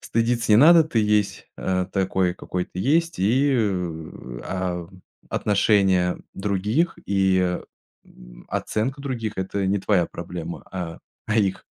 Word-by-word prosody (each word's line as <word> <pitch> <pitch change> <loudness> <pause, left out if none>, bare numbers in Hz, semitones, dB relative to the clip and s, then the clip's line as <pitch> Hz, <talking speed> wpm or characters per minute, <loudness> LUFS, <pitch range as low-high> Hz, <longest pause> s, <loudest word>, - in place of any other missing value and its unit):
стыдиться 115 0 0
не 105 - +8
надо, 165 +6 +8
ты 150 -7 -1
есть, 105 -1 +1
э, 90 -1 -1
такой, 95 -2 +1
какой 90 0 -4
ты 90 - -7
есть. 165 - +1
И 130 +8 +3
в, 85 - -3
а, 90 -2 -3 0.4
отношения 95 -3 +2 0.2
других 105 - 0
и, 95 -2 +2 0.5
м, - - -16
оценка 130 +6 -2
других- 120 -6 -3
это 95 +1 -2
не 100 +1 +1
твоя 95 -3 +2
проблема, 85 0 -7
а 85 -3 -5 0.3
а 105 - 0
их. 95 -3 0
95 Hz, 130 wpm, -23 LUFS, 90-110 Hz, 0.5 s, не